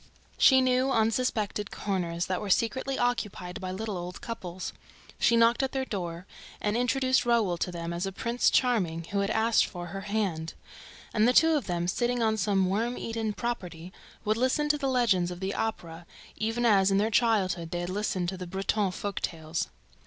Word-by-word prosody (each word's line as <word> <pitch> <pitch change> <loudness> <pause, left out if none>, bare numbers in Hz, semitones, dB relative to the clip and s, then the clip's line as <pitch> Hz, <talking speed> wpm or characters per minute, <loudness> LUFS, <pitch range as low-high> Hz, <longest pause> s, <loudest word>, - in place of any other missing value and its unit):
She 265 -1 +7
knew 255 +1 +2
unsuspected 220 -3 0
corners 175 -4 -2
that 185 -1 -2
were 205 - -4
secretly 260 +6 +1
occupied 210 -7 -2
by 185 - -4
little 210 +2 -4
old 180 +1 -7
couples. 185 -6 -6 0.5
She 235 - +4
knocked 230 +2 +4
at 265 -1 -1
their 265 -1 -1
door 175 -5 -5 0.3
and 210 +1 -1
introduced 255 +2 +2
Raoul 230 -7 +2
to 180 - -1
them 170 0 -4
as 175 +3 -2
a - - -3
Prince 235 +5 +1
Charming 185 -10 +1
who 200 - 0
had 200 0 0
asked 220 +1 +3
for 175 -1 -7
her 195 - -4
hand; 195 -6 -2 0.6
and 215 +1 +4
the 250 - +4
two 325 +4 +6
of 290 - -1
them, 175 -1 -1
sitting 240 +5 0
on 220 -1 +2
some 195 -2 +1
worm 230 +6 -1
eaten 225 -1 -2
"property," 185 -7 -5 0.3
would 215 +1 +1
listen 260 +5 +1
to 295 - +3
the 275 - 0
legends 220 -9 +2
of 175 -1 -7
the 190 +1 -2
Opera, 170 -6 -4 0.3
even 225 +2 -1
as, 195 -4 +5
in 195 - +3
their 215 +3 +1
childhood, 195 -8 +2
they 175 0 -3
had 175 - -4
listened 195 -2 -1
to 190 - -5
the 180 - -6
old - - -11
Breton 195 +1 0 0.3
tales. 160 -1 -3
210 Hz, 190 wpm, -28 LUFS, 180-235 Hz, 0.6 s, She